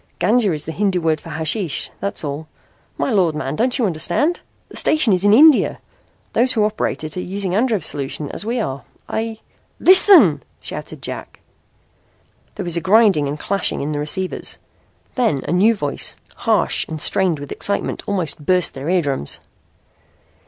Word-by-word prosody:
"Ganja 215 Hz, +1 st, +2 dB
is 150 Hz, -2 st, -4 dB
the 160 Hz, -, -5 dB
Hindu 195 Hz, +1 st, 0 dB
word 160 Hz, -2 st, -1 dB
for -, -, -11 dB
hashish, 160 Hz, +2 st, -2 dB
that's 200 Hz, -2 st, -2 dB
all. 145 Hz, +1 st, -5 dB, 0.5 s
My -, -, -1 dB
Lord, 180 Hz, -7 st, +1 dB
man, 135 Hz, -1 st, -4 dB
don't 250 Hz, -, +1 dB
you 245 Hz, -, +1 dB
understand? 210 Hz, -, 0 dB, 0.3 s
The -, -, -10 dB
station 285 Hz, -9 st, +2 dB
is 185 Hz, 0 st, +1 dB
in 205 Hz, -, +4 dB
India. 295 Hz, +6 st, +5 dB, 0.6 s
Those 250 Hz, +2 st, +2 dB
who 220 Hz, -, +1 dB
operate 215 Hz, -6 st, -2 dB
it 155 Hz, -1 st, -5 dB
are -, -, -2 dB
using 190 Hz, 0 st, -4 dB
Andrev's 215 Hz, -5 st, +1 dB
solution 145 Hz, +1 st, -3 dB
as -, -, -5 dB
we 235 Hz, +3 st, -2 dB
are. 135 Hz, -10 st, -4 dB, 0.3 s
I 225 Hz, 0 st, -4 dB, 0.2 s
" -, -, -41 dB
"Listen!" 380 Hz, 0 st, +8 dB, 0.2 s
shouted -, -, -8 dB
Jack. -, -, -8 dB, 1.1 s
There 205 Hz, -, -5 dB
was 175 Hz, -2 st, -2 dB
a 170 Hz, -, -1 dB
grinding 195 Hz, -6 st, +3 dB
and 145 Hz, +2 st, -4 dB
clashing 195 Hz, +5 st, -1 dB
in 145 Hz, +2 st, -3 dB
the 145 Hz, -, -3 dB
receivers. 185 Hz, +6 st, -2 dB, 0.6 s
Then 225 Hz, -, 0 dB
a -, -, -2 dB
new 205 Hz, +6 st, +3 dB
voice, 145 Hz, -8 st, -1 dB, 0.2 s
harsh -, -, 0 dB
and 160 Hz, -1 st, -6 dB
strained 180 Hz, +1 st, +3 dB
with 145 Hz, 0 st, -9 dB
excitement, 200 Hz, -, -2 dB
almost 170 Hz, -7 st, -1 dB
burst 180 Hz, +1 st, +2 dB
their 135 Hz, +4 st, -6 dB
eardrums. 145 Hz, -, -1 dB
185 Hz, 170 wpm, -19 LUFS, 155-215 Hz, 1.1 s, Listen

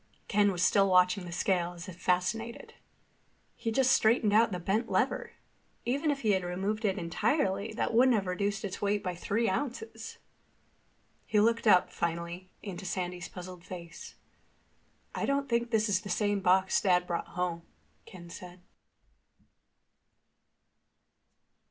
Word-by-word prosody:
Ken 205 Hz, 0 st, +3 dB
was 175 Hz, -2 st, -1 dB
still 195 Hz, +1 st, +4 dB
watching 180 Hz, +1 st, +4 dB
the 175 Hz, -, -7 dB
scale 175 Hz, 0 st, 0 dB
as 175 Hz, +2 st, -9 dB
if 185 Hz, -, -8 dB
fascinated. 225 Hz, -, -1 dB, 0.8 s
"He 225 Hz, -, -3 dB
just 260 Hz, +2 st, +3 dB
straightened 220 Hz, -1 st, +3 dB
the 215 Hz, -3 st, +3 dB
bent 195 Hz, +6 st, -1 dB
lever. -, -, 0 dB, 0.5 s
Even 280 Hz, +6 st, 0 dB
if 280 Hz, -1 st, -1 dB
he 215 Hz, -, +2 dB
had 190 Hz, -2 st, +1 dB
removed 195 Hz, +5 st, -2 dB
it 195 Hz, -2 st, +1 dB
entirely 200 Hz, -, 0 dB
that 225 Hz, -, -2 dB
wouldn't 250 Hz, +2 st, +5 dB
have 200 Hz, -3 st, 0 dB
reduced 200 Hz, +3 st, -2 dB
the 195 Hz, -3 st, -3 dB
weight 205 Hz, 0 st, 0 dB
by 180 Hz, -, -2 dB
three 210 Hz, +6 st, -1 dB
ounces." 270 Hz, -, -4 dB, 1.1 s
He 210 Hz, -, +2 dB
looked 230 Hz, +2 st, +2 dB
up, 180 Hz, -4 st, +5 dB
finally, 170 Hz, +2 st, -4 dB
into 195 Hz, -2 st, -6 dB
Sandy's 180 Hz, -1 st, -4 dB
puzzled 180 Hz, -1 st, -9 dB
face. 170 Hz, -2 st, -9 dB, 1.0 s
"I -, -, -2 dB
don't 275 Hz, 0 st, 0 dB
think 235 Hz, -1 st, 0 dB
this 220 Hz, -1 st, +2 dB
is 195 Hz, -2 st, +1 dB
the 205 Hz, -, -8 dB
same 205 Hz, +2 st, +1 dB
box 190 Hz, 0 st, +3 dB
Dad 180 Hz, -2 st, +3 dB
brought 170 Hz, -1 st, -3 dB
home," 175 Hz, -2 st, -1 dB, 0.5 s
Ken 175 Hz, -2 st, -11 dB
said. 180 Hz, 0 st, -10 dB
195 Hz, 145 wpm, -30 LUFS, 180-220 Hz, 1.1 s, wouldn't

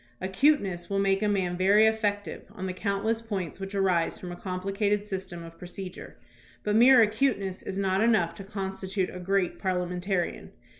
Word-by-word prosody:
Acuteness 190 Hz, -, +1 dB
will 200 Hz, -, 0 dB
make 195 Hz, 0 st, +2 dB
a 210 Hz, -, +2 dB
man 190 Hz, -3 st, 0 dB
very 200 Hz, +4 st, +5 dB
effective 210 Hz, -2 st, -1 dB
on 185 Hz, -, -6 dB
the 185 Hz, -, -3 dB
countless 200 Hz, +4 st, -1 dB
points 195 Hz, -7 st, -4 dB
which 195 Hz, +1 st, -6 dB
arise 185 Hz, -4 st, +1 dB
from 180 Hz, -, -7 dB
a -, -, -6 dB
complicated 195 Hz, +3 st, -1 dB
system 190 Hz, -4 st, -5 dB
of 165 Hz, 0 st, -12 dB
procedure, 180 Hz, +1 st, -8 dB, 0.5 s
but 210 Hz, 0 st, 0 dB
mere 245 Hz, +2 st, +8 dB
acuteness 210 Hz, -4 st, +1 dB
is 190 Hz, -, -5 dB
not 195 Hz, 0 st, +1 dB
enough 215 Hz, -8 st, +3 dB
to 195 Hz, -, -9 dB
constitute 190 Hz, -1 st, -3 dB
a -, -, -5 dB
great 190 Hz, 0 st, 0 dB
parliamentarian. 180 Hz, 0 st, -2 dB
195 Hz, 165 wpm, -28 LUFS, 185-210 Hz, 0.5 s, mere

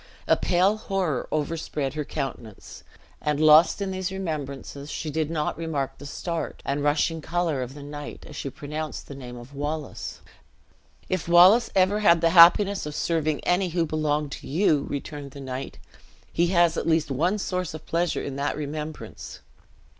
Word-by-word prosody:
A -, -, +5 dB
pale 190 Hz, +4 st, +2 dB
horror 190 Hz, -, -2 dB
overspread 150 Hz, -3 st, -2 dB
her 150 Hz, 0 st, -2 dB
countenance; 120 Hz, -7 st, -6 dB, 0.4 s
and 150 Hz, -1 st, 0 dB
lost 155 Hz, +5 st, +6 dB
in 195 Hz, -, -3 dB
these 185 Hz, 0 st, -3 dB
remembrances, 145 Hz, -6 st, -5 dB
she 155 Hz, 0 st, -4 dB
did 155 Hz, 0 st, -1 dB
not 160 Hz, -1 st, -2 dB
remark 150 Hz, -5 st, -3 dB
the 140 Hz, -, -8 dB
start, 165 Hz, +2 st, -4 dB
and 140 Hz, +1 st, -1 dB
rushing 155 Hz, +2 st, +1 dB
color 160 Hz, -3 st, -1 dB
of 130 Hz, +2 st, -6 dB
the 145 Hz, -, -9 dB
knight, 145 Hz, 0 st, -8 dB
as -, -, -11 dB
she 140 Hz, -, -4 dB
pronounced 150 Hz, +3 st, -6 dB
the -, -, -8 dB
name 125 Hz, -3 st, -9 dB
of 120 Hz, +3 st, -12 dB
Wallace. 145 Hz, +1 st, -5 dB, 0.9 s
"If 185 Hz, -4 st, -2 dB
Wallace 185 Hz, +7 st, +7 dB
ever 195 Hz, +2 st, +3 dB
had 170 Hz, -5 st, +5 dB
the 165 Hz, 0 st, +3 dB
happiness 185 Hz, +2 st, +6 dB
of 150 Hz, -, -6 dB
serving 155 Hz, -3 st, 0 dB
any 180 Hz, +1 st, +1 dB
who 170 Hz, 0 st, 0 dB
belonged 150 Hz, -2 st, -1 dB
to -, -, -8 dB
you," 155 Hz, -2 st, +2 dB
returned 140 Hz, -1 st, -6 dB
the 140 Hz, -, -9 dB
knight, 130 Hz, -1 st, -6 dB, 0.6 s
"he 170 Hz, -, +2 dB
has 175 Hz, -2 st, +3 dB
at -, -, -2 dB
least 160 Hz, -3 st, +2 dB
one 170 Hz, +10 st, +1 dB
source 180 Hz, -5 st, -3 dB
of 155 Hz, -, -10 dB
pleasure 170 Hz, 0 st, 0 dB
in 140 Hz, -1 st, -5 dB
that 145 Hz, +1 st, -1 dB
remembrance. 150 Hz, +1 st, -6 dB
155 Hz, 170 wpm, -25 LUFS, 145-175 Hz, 0.9 s, Wallace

